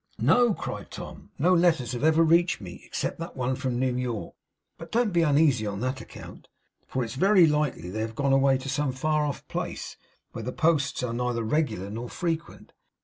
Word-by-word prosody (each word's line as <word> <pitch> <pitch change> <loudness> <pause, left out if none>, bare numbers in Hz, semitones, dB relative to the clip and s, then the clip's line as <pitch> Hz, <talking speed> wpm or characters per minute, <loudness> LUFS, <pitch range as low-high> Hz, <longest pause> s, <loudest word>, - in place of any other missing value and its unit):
'No,' 240 -4 +4
cried - - -6
Tom. - - -9
'No 175 +6 +3
letters 170 -8 +3
have 125 +1 -4
ever 160 +1 +5
reached 170 +2 +3
me, 90 -3 -9
except - - -3
that 165 -2 -7
one 130 0 0
from 130 -2 -2
New 130 0 0
York. 125 -4 -3 0.5
But 165 0 -10
don't 230 -4 +1
be 170 - +3
uneasy 145 -7 +3
on 100 -1 -4
that 130 +1 -2
account, - - -12 0.4
for 130 - -1
it's 115 -1 -5
very 190 +5 +5
likely 150 - 0
they 110 +3 -3
have 110 0 -4
gone 140 +1 +1
away 135 0 +4
to 135 +1 -8
some 135 0 -1
far 155 +3 0
off 140 - -6
place, - - -5 0.3
where 115 - -6
the 125 - -4
posts 145 -5 +1
are 120 -2 -2
neither 120 -1 -1
regular 110 - -1
nor 115 +3 -5
frequent. 165 -2 -4
135 Hz, 200 wpm, -27 LUFS, 120-160 Hz, 0.5 s, ever